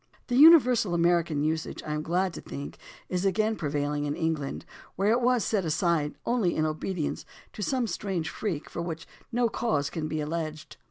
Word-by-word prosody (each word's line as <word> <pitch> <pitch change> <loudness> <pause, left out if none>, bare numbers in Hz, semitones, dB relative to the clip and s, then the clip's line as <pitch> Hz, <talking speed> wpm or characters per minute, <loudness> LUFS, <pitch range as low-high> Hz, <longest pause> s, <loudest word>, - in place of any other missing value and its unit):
The 250 +4 +6
imiversal 250 - +6
American 170 -3 +2
usage, 160 +1 -2
I 150 - -3
am 150 - -2
glad 180 +3 0
to - - -7
think, 140 +1 -8 0.3
is 180 0 -2
again 215 +3 +1
prevailing 145 -2 -2
in 145 0 -2
England, 160 -4 -2 0.3
where 200 +3 +2
it 240 +2 +2
was 245 -2 +3
set 205 -4 +1
aside 160 -2 0
only 230 -8 +1
in 155 - +1
obedience 155 +1 -3 0.3
to - - -7
some 255 +3 0
strange 185 -4 -3
freak 175 -9 -3
for - - -5
which 165 -2 -5 0.2
no 240 0 +2
cause 150 -12 -1
can 155 -2 -3
be 155 0 -3
alleged. 155 0 -4
170 Hz, 180 wpm, -28 LUFS, 155-210 Hz, 0.3 s, The